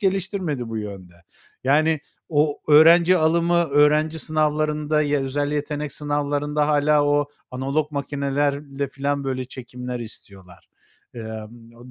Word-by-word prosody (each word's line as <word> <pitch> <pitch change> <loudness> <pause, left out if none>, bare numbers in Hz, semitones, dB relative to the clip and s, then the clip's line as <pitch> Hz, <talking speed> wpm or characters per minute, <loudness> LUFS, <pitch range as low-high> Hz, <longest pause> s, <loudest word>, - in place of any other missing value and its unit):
geliştirmedi 190 - -1
bu 115 - -5
yönde. 100 -4 -8 0.5
Yani, 155 +3 +3 0.3
o 150 -1 +1
öğrenci 165 +4 +7
alımı, 170 +1 +2
öğrenci 150 +2 +3
sınavlarında, 150 0 0
ya 145 -1 0
özel 145 +2 -2
yetenek 150 0 -3
sınavlarında 145 0 -1
hâlâ 150 0 +3
o 145 0 +2 0.2
analog 140 +4 -2
makinelerle 140 0 -2
filan, 140 +1 -2
böyle, 130 -1 -2
çekimler 125 -1 -7
istiyorlar. 100 -5 -13 0.5
Emm, 115 +2 -10
145 Hz, 110 wpm, -22 LUFS, 130-150 Hz, 0.5 s, öğrenci